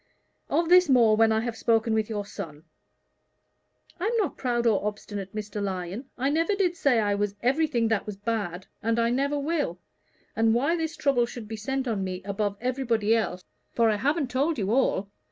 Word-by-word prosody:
Of 335 0 +1
this 360 -1 +6
more 235 -5 +5
when 225 0 +4
I 220 0 +2
have 235 -1 -3
spoken 225 0 +1
with 220 0 0
your 205 -2 -3
son." 160 -7 -8 1.4
"I'm 440 +6 0
not 395 -9 0
proud 240 -2 -1
or 215 -4 +3
obstinate, 205 -1 -5
Mr. 210 -1 -4
Lyon. 195 +6 -4
I 270 +3 +1
never 330 +6 +1
did 365 -3 +1
say 270 -8 +3
I 205 -2 +1
was 205 0 -1
everything 260 -2 +2
that 220 -2 0
was 210 -2 -5
bad, 200 -4 -3 0.2
and 230 +1 0
I 235 0 +2
never 280 +3 0
will. 285 - -1 0.6
And 225 0 +3
why 280 +8 +2
this 325 0 -3
trouble 255 -5 +2
should 235 -2 -8
be 220 - -5
sent 265 +4 -3
on 210 -5 -1
me 185 0 -4
above 200 0 -2
everybody 235 -4 +1
else 180 -5 -2 0.3
for 230 -2 +3
I 210 - 0
haven't 285 +3 0
told 285 +5 +1
you 200 -2 -1
all. 205 -6 +1
230 Hz, 190 wpm, -26 LUFS, 205-270 Hz, 1.4 s, this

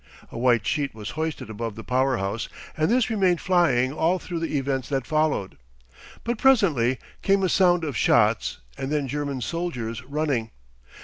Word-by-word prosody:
A - - -7
white 120 -3 +3
sheet 140 -6 -1
was 110 +1 -6
hoisted 155 -6 -4
above 110 0 -4
the 110 - -8
power 130 +1 +1
house, 100 +4 -3 0.3
and 155 0 +1
this 240 0 +2
remained 190 -5 +2
flying 140 -9 +2
all 165 +4 +2
through 175 -1 -5
the 165 -2 -1
events 135 -2 -2
that 135 -3 -1
followed. 155 - 0 0.6
But 235 -1 -2
presently 165 - +3 0.2
came 195 -1 +2
a 185 - +2
sound 175 -3 +4
of 145 -4 -3
shots 110 -1 +2 0.2
and 135 - -3
then 150 -2 0
German 140 -1 -3
soldiers 125 -6 -3
running. 140 -5 -1
140 Hz, 170 wpm, -25 LUFS, 120-170 Hz, 0.6 s, sound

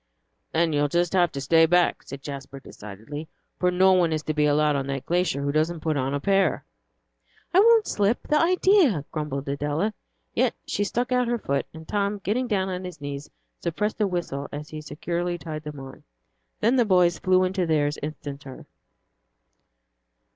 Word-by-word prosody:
"Then 165 -1 +1
you'll 145 0 +2
just 175 +4 0
have 175 -3 +3
to 140 - -4
stay 165 +4 +4
back," 175 +1 +3
said 135 0 -10
Jasper, 140 -2 -7
decidedly, 115 +7 -9 0.3
"for 180 - +3
no 185 +1 +4
one 175 -3 +3
is 155 -1 -1
to 155 - -2
be 150 -1 +2
allowed 150 0 +3
on 135 -1 -2
that 135 -1 -4
glacier 175 -5 0
who 140 - 0
doesn't 155 +2 0
put 155 -1 0
on 135 0 -1
a - - -1
pair." 195 +4 +1 0.9
"I 365 - +6
won't 450 0 +6
slip 205 +3 +1
the 300 - +3
idea!" 340 - +3
grumbled 150 -3 -4
Adela. 145 +9 -1 0.4
Yet - - +1
she 205 - -1
stuck 245 +5 -2
out 250 -1 +2
her 240 0 0
foot, 140 -10 -2
and 160 -1 -12
Tom, 205 0 0
getting 215 +6 -1
down 195 -4 0
on 185 -1 -4
his 180 -3 -8
knees, 145 0 -6 0.3
suppressed 210 +6 -2
a 210 - +3
whistle 170 -6 -3
as 150 +1 -7
he 155 -1 -7
securely 175 +3 -3
tied 155 -1 -6
them 150 -2 -7
on. 135 0 -10 0.6
Then 235 +5 +3
the 245 - +5
boys 180 -4 +3
flew 185 0 +3
into 185 -1 0
theirs 150 -2 +1
instanter. 140 -3 -7
165 Hz, 185 wpm, -25 LUFS, 145-190 Hz, 0.9 s, I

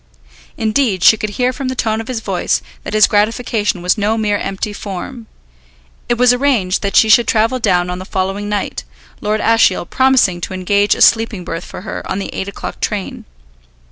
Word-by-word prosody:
Indeed, 220 -4 0
she - - +7
could 215 0 -4
hear 250 0 +1
from 270 0 -5
the 260 - -3
tone 220 -2 -1
of 225 - -10
his 245 -3 -4
voice 195 -4 -1 0.2
that - - -5
his 215 - +6
gratification 210 -3 0
was 180 +5 +1
no 210 +2 0
mere 210 -2 0
empty 195 +2 -4
form. 215 +4 -7 0.8
It 240 - +1
was 250 0 +5
arranged 245 -8 +1
that 200 -1 -3
she 220 - +6
should 230 +2 +5
travel 225 +3 +1
down 180 -6 +1
on 180 - -5
the - - -6
following 195 +2 -3
night, 200 - -3 0.4
Lord 215 +1 -1
Ashiel 225 -6 +3
promising 250 -7 +2
to 185 - -5
engage 200 +2 +2
a - - -6
sleeping 225 -5 +3
berth 165 +1 -5
for - - -9
her 205 - -6
on - - -2
the 200 - -5
eight 190 - -4
o'clock 200 - -7
train. 205 -3 -4
210 Hz, 195 wpm, -16 LUFS, 190-230 Hz, 0.8 s, she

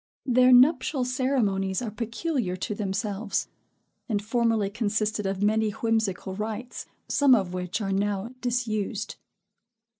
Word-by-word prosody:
Their 255 0 +5
nuptial 260 +1 +5
ceremonies 235 -7 0
are 235 -4 -4
peculiar 235 - -2
to 190 +3 -3
themselves; 200 0 -2 0.6
and 210 -3 +1
formerly 225 -1 +1
consisted 215 -1 -1
of 195 +1 -2
many 215 +1 +2
whimsical 215 -4 -1
rites, 220 +4 -5 0.2
some 280 -3 +5
of 190 -5 -1
which 180 +3 -3
are 195 -2 -2
now 200 +2 -1
disused. 230 -3 -2
215 Hz, 120 wpm, -26 LUFS, 200-245 Hz, 0.6 s, Their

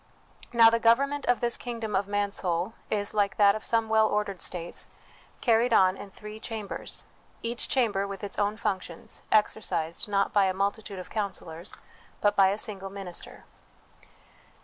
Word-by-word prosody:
Now, 230 -1 +7
the 230 - +2
govern 235 +5 +4
ment 290 0 -4
of 245 - +3
this 240 -1 +1
kingdom 230 -4 -4
of 195 +1 +1
Mansoul 200 -2 0 0.2
is, 205 -1 +1
like 200 -2 +1
that 200 -1 +6
of 215 - -5
some 225 -1 +1
well 220 0 +4
ordered 205 -3 -1
states, 175 -1 -4 0.5
carried 235 0 +3
on 185 -3 +5
in 195 - -9
three 210 +2 -10
cham 220 -2 -5
bers, - - -6 0.4
each 235 +1 -2
chamber 210 -6 +1
with 200 +1 -7
its 205 - -5
own 205 +1 +1
functions, 190 -6 -3
exercised, 210 -5 +1
not 200 -1 +1
by 200 -2 +5
a 185 -1 0
multitude 200 +1 -2
of 185 - -8
counsellors, 190 -5 -4 0.4
but 205 0 +2
by 195 -2 +6
a 195 +2 +1
single 195 -3 -3
minister. 195 -3 -6
205 Hz, 170 wpm, -28 LUFS, 195-225 Hz, 0.5 s, Now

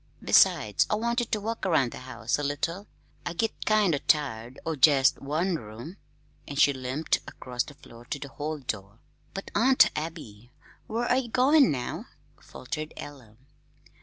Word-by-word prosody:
Besides, - - +4
I - - +2
wanted 235 +2 -1
to 215 - +1
walk 225 +2 -4
around 155 -10 +2
the - - -8
house 130 0 -3
a - - -2
little. 165 +8 -2 0.4
I 175 - -4
git 225 +6 -2
kind 215 -5 +4
o' 140 - 0
tired 130 -6 0
o' 160 - -1
jest 140 -1 +5
one 160 +6 0
room." 115 - -10 0.5
And 140 0 -4
she 140 - +6
limped 130 +4 -1
across 125 -1 -4
the 145 - -6
floor 120 -3 -15
to 145 - -4
the 140 0 -8
hall 150 +3 -4
door. 110 -6 -6 0.4
"But, 195 - -6
Aunt 255 +5 +5
Abby, 150 -9 -6 0.4
where 235 +3 0
ye 260 -2 0
goin' 265 +4 +5
now?" 125 -3 -3 0.3
faltered 155 +4 -7
Ella. 125 -7 -10
150 Hz, 165 wpm, -27 LUFS, 130-200 Hz, 0.5 s, she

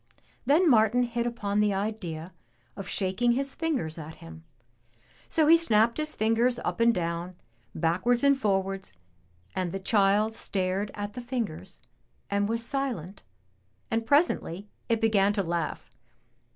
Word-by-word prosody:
Then 320 +6 +5
Martin 240 -1 +4
hit 235 0 -1
upon 210 -4 -2
the 210 -2 +2
idea 185 -5 -4 0.4
of 195 - -7
shaking 205 +5 +1
his 275 +2 -2
fingers 260 - -2
at 160 +1 -8
him, 80 0 -12 0.9
so 315 - +3
he 325 +2 +8
snapped 230 -8 +3
his 305 0 -2
fingers 230 +3 +2
up - - -2
and 230 0 +5
down, 170 -2 -3 0.4
backwards 185 - +1
and 280 0 +5
forwards, 195 -5 -1 0.6
and 185 -2 -1
the 195 - -4
child 205 +2 +2
stared 195 -1 -2
at 205 0 -5
the 250 - -6
fingers 235 - -5 0.5
and 200 +1 +1
was 230 0 -1
silent 235 - -3 0.7
and 225 0 +1
presently 210 - +1 0.2
it 230 -1 +1
began 205 -2 +3
to 200 -1 0
laugh. 165 - -3
210 Hz, 140 wpm, -27 LUFS, 185-240 Hz, 0.9 s, he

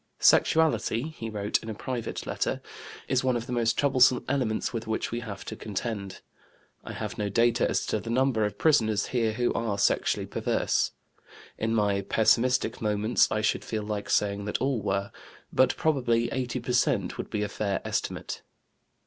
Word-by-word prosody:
"Sexuality" 160 -4 +3
(he 115 -8 -7
wrote 105 -1 -1
in 110 - -8
a 110 - -4
private 120 +1 -4
letter) - - -1 0.5
"is 130 -1 +1
one 130 -2 +2
of 115 - -5
the 125 - -7
most 115 -2 +1
troublesome 130 -3 +4
elements 125 -6 -1
with 115 -1 -4
which 110 - -2
we 120 - -2
have 100 -4 -7
to 110 - -5
contend. 105 -2 -5 0.6
I - - -7
have - - -5
no 105 -1 -1
data 115 +3 +2
as - - 0
to - - -1
the - - -7
number 125 -2 +2
of 105 -1 -2
prisoners 110 -7 +3
here 115 -3 +1
who 120 +2 0
are 110 -3 -1
sexually 100 - +1
perverse. - - 0 0.7
In 115 +1 0
my 100 -2 +2
pessimistic 125 +5 +2
moments 105 +2 +2
I 110 - 0
should 110 - 0
feel 110 -2 -3
like 105 -1 -4
saying 100 0 +1
that 105 - -1
all 135 -4 0
were; 100 0 -1 0.4
but 130 - +3
probably 120 -6 +1
80 125 -1 -2
per 125 - -3
cent, 120 - +1
would - - -4
be 105 -2 -1
a - - -1
fair 100 -1 -2
estimate." - - -3
115 Hz, 180 wpm, -27 LUFS, 105-125 Hz, 0.7 s, troublesome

